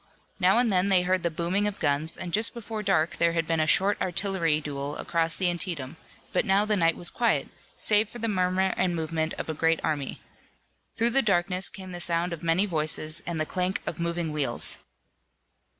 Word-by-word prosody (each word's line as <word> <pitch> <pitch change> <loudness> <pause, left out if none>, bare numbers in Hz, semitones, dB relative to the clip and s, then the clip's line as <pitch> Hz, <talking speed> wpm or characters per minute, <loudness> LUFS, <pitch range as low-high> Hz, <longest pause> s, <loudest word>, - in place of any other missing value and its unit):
Now 190 +3 +4
and 240 -2 +3
then 185 0 +2
they 190 -2 +4
heard 185 0 +1
the 170 - 0
booming 175 +5 -1
of 205 - -4
guns, 145 +3 -1
and 175 -2 -6
just 220 +3 +2
before 220 -2 -5
dark 180 -5 +1
there 170 0 +2
had 165 -1 0
been 165 0 0
a 155 - +1
short 195 +5 +2
artillery 175 -4 +1
duel 145 -1 -5
across 165 -1 0
the 185 - +1
Antietam, 170 -5 -2 0.4
but - - +2
now 200 -1 +2
the 215 0 +2
night 165 -4 +2
was 175 - 0
quiet, 235 -1 0 0.3
save 210 0 +3
for - - -10
the 230 -1 -2
murmur 185 -1 +1
and 180 -2 +1
movement 160 0 -2
of - - -6
a 160 - -2
great 165 +1 +1
army. 145 -3 -2 0.8
Through 235 +1 +1
the 270 - +3
darkness 185 -3 +2
came 190 -1 -10
the 175 - -6
sound 170 0 0
of 165 - -7
many 170 +4 +2
voices 155 -2 +2
and 170 -2 -2
the 155 - +1
clank 185 +3 -2
of - - -5
moving 170 -1 -2
wheels. 140 -5 0
175 Hz, 205 wpm, -26 LUFS, 160-195 Hz, 0.8 s, Now